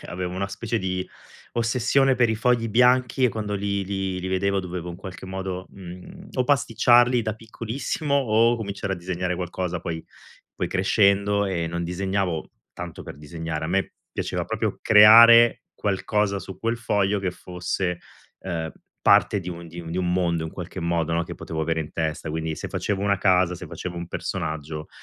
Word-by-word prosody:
Perché - - -11
avevo 90 0 -4
una 100 +1 -2
specie 115 +3 -3
di 95 0 -2 0.4
ossessione 125 +3 +2
per 120 -1 +4
i 110 - +1
fogli 115 +1 +1
bianchi 125 +3 +3
e 125 - +6
quando 105 -2 -3
li 100 0 -1
li 95 -1 -2
li 90 - -5
vedevo 100 +1 0
dovevo 90 -2 -5
in 85 - -8
qualche 95 +1 -9
modo, 95 -1 -5
uhm, 90 -1 -11
o 130 - +1
pasticciarli 120 -2 +4
da 110 -2 -2
piccolissimo, 115 +6 -4
o 115 -2 +3
cominciare 100 -3 -3
a - - -9
disegnare 90 0 -3
qualcosa, 90 0 -3
poi 80 -1 -5 0.5
poi - - -1
crescendo, 100 +1 +2
ehm, 85 -4 -2
non 85 0 -3
disegnavo 90 -1 -2 0.2
tanto - - -8
per - - -9
disegnare, 80 +1 -5
a - - -3
me 95 +2 0 0.2
piaceva - - -3
proprio - - -2
creare 115 +2 +8
qualcosa 100 0 0
su 95 - -9
quel 115 +1 -1
foglio 105 -3 0
che 95 -1 -1
fosse, 90 0 -3 0.4
ehm, 80 -4 -4 0.3
parte 105 - +4
di 90 - -7
un 85 -1 -7
di 85 +2 -8
un 80 -1 -8
di 85 - -4
un 90 -1 0
mondo 85 -2 +1
in 80 - -5
qualche 90 +2 -7
modo, 85 -1 0
no, 85 - +1
che 85 - -7
potevo 80 -1 -5
avere 80 +1 0
in 80 - -6
testa. 80 0 -2
Quindi 80 0 -3
se - - -5
facevo 100 -2 -2
una 100 0 +2
casa, 90 -2 +3
se - - -8
facevo 90 -1 -6
un 85 0 -5
personaggio, 75 -2 -4
95 Hz, 185 wpm, -24 LUFS, 85-110 Hz, 0.5 s, creare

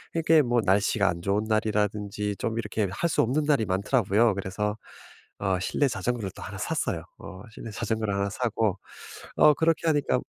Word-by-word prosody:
이게 165 -1 +4
뭐 120 -1 +1
날씨가 100 +1 +2
안 85 -2 -3
좋은 100 +3 0
날이라든지 105 -1 -1
좀 115 0 -2
이렇게 105 -2 -1
할 170 - -1
수 - - +2
없는 135 +7 0
날이 140 -7 +3
많더라고요. 105 +3 +2
그래서 100 +2 -2 0.6
어 95 -2 0
실내 140 +9 +1
자전거를 120 -5 -2
또 - - -9
1 - - -7
샀어요. - - -2 0.2
어 95 0 -10
실내 110 - -9
자전거를 110 0 -2
1 100 0 0
사고 110 -3 0 0.6
어 150 - +7
그렇게 165 +1 +1
하니까 145 -5 +2
110 Hz, 345 characters per minute, -26 LUFS, 100-120 Hz, 0.6 s, 어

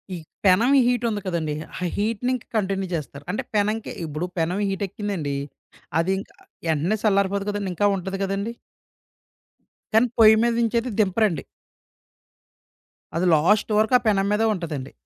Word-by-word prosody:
ఈ - - -5 0.3
పెనం 200 +7 +5 0.2
హీట్ 245 -1 +1
ఉంది 210 -2 -3
కదండీ. 160 -4 -1 0.2
ఆ - - -4
హీట్‌ని 225 +4 -1
ఇంకా 250 - -9
కంటిన్యూ 195 -2 -1
చేస్తారు. 145 -2 -6
అంటే 205 - -2
పెనంకి 210 +2 0
ఇప్పుడు 155 +2 -3
పెనమి 180 +5 0
హీట్ 195 +1 -3
ఎక్కిందండి, 190 -8 -3 0.6
అది 170 +3 +1
ఇంకా - - -11 0.4
ఎంటనే 165 +8 0
సల్లారిపోదు 200 -1 +2
కదండీ! 205 -2 -2
ఇంకా 205 +4 +3
ఉంటది 190 +1 -4
కదండీ! 195 +4 -2 1.4
కానీ 225 +3 +5
పొయ్యి 220 -1 +8
మీద 235 0 +2
నుంచేది 235 +2 0
దింపరండి. 205 -3 +2 1.7
అది 170 +2 +1
లాస్ట్ 200 +9 +3
వరకు 220 +3 +3
ఆ - - -17
పెనం 195 -2 +3
మీదే 210 +2 +2
ఉంటదండి. 155 -8 -5
200 Hz, 145 wpm, -23 LUFS, 180-215 Hz, 1.7 s, పొయ్యి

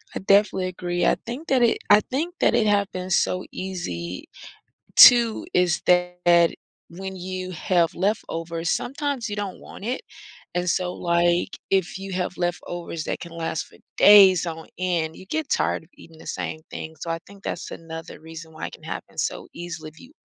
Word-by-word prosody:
I - - -2
definitely 195 -1 +3
agree, 175 -1 -2
I - - +4
think 270 +7 -6
that 265 -2 +3
it 235 -1 +4
I 210 - +8
think 325 - -3
that - - +3
it 220 -3 +3
happened 190 -3 0
so 185 +2 +1
easy. 90 - -5 0.7
2 235 +4 +8
is 175 -3 +2
that 180 -1 +4 0.4
when 190 +2 -7
you 185 0 -5
have 170 0 +1
leftovers, 170 -4 -2
sometimes 275 -3 -2
you 205 - -3
don't 205 -2 -4
want 200 - -11
it. 250 +2 -2 0.5
And 180 0 0
so, 180 0 0
like, 175 +1 +1
if 190 -1 0
you 195 0 -7
have 180 0 -2
leftovers 175 -2 -3
that - - -3
can 170 - -9
last 165 -1 -3
for - - -19 0.2
days 195 -4 +8
on 160 -1 -6
end, 170 -3 -1
you - - -12
get 315 +2 -2
tired - - 0
of 160 - -23
eating 165 -1 -16
the - - -14
same 155 - -4
thing. 160 0 -7
So 165 - -4
I 165 - -2
think 200 -1 -15
that's - - -4
another 165 0 -8
reason 160 0 -10
why - - -5
it - - -12
can - - -13
happen - - -7
so - - -2
easily 165 -2 -7
if 165 - -19
you 255 - -15
180 Hz, 185 wpm, -24 LUFS, 165-200 Hz, 0.7 s, I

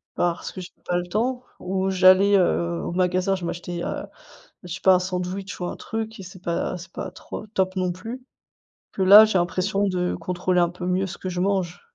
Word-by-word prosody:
Parce 175 -1 -1
que 185 - -8
j'avais 180 - -12
pas 175 - 0
le 175 - -2
temps. 245 +6 -1 0.2
Ou 190 +1 -1
j'allais, 190 +2 +6
heu, 170 -2 +1
au - - -4
magasin 185 +1 +1
je 180 -2 -5
m'achetais, 175 0 -4
heu, - - -4 0.6
je 180 - -8
sais 190 - -6
pas 190 -1 +6
un - - +4
sandwich 185 +1 -4
ou 175 - -2
un - - -5
truc 225 -1 -5
et - - -6
c'est 185 0 -12
pas 170 +1 -2
c'est 175 +2 -12
pas 185 - -5
trop 210 +3 -8
top 190 -2 -1
non 180 -1 0
plus. 225 +8 -8 0.7
Que 195 - -4
là, 200 +3 +10
j'ai 215 -3 +1
l'impression 185 +3 0
de 180 -1 -1
contrôler 180 +1 -1
un 175 - +3
peu 180 0 -7
mieux 185 +2 0
ce - - -7
que 185 - -5
je 180 - -4
mange. 185 -3 -1
185 Hz, 220 wpm, -24 LUFS, 180-195 Hz, 0.7 s, là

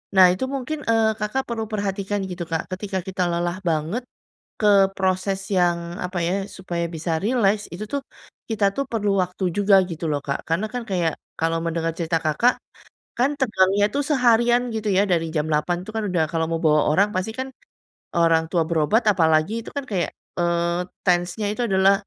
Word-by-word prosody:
Nah 185 - +9
itu 225 +8 -2
mungkin 295 +4 -3
eee, 225 -1 +3
Kakak 215 +6 -1
perlu 225 -1 -2
perhatikan 200 -1 -2
gitu 175 -1 -4
Kak. 160 - 0
Ketika 190 0 -3
kita 185 -1 -1
lelah 175 +1 -1
banget 165 +10 -1 0.6
ke 210 - +2 0.3
proses 190 +1 0 0.2
yang 175 -1 +3 0.3
apa 180 0 -3
ya, 180 - 0 0.2
supaya 175 -2 -4
bisa 165 +1 -3
rileks, 210 -3 +2
itu 200 +5 -5
tuh, 280 - 0 0.5
kita 215 -2 +1
tuh 275 - -1
perlu 210 -3 0
waktu 180 +1 -6
juga 200 -1 +5
gitu 165 0 -5
loh 145 -1 -1
Kak. 140 - -1
Karena 180 +7 +1
kan 245 -1 -3
kayak 170 -4 +1 0.3
kalau 165 0 +1
mendengar 165 0 -1
cerita 165 -1 0
Kakak, 155 +11 +3 0.6
kan 255 +3 +3
tegangnya 205 -5 +3
itu 285 - -1
seharian 240 -3 +4
gitu 220 -1 -3
ya 200 - +5
dari 165 -1 +2
jam 150 0 +1
08:00 150 +4 +1
itu 220 - -8
kan 220 - -1 0.3
kalau 165 -1 0
mau 165 - -1
bawa 150 -1 +4
orang 195 +7 +3
pasti 185 +4 -1
kan 260 - -2 0.7
orang 165 -1 +3
tua 170 -3 +2
berobat 170 +8 +2
apalagi 160 0 +3
itu - - -7
kan 285 - -2
kayak 180 -6 0 0.3
eee, 170 +1 0 0.2
tense 175 -1 +2
nya 210 - 0
itu 245 - -3
adalah, 190 0 +4
190 Hz, 180 wpm, -23 LUFS, 170-215 Hz, 0.7 s, Nah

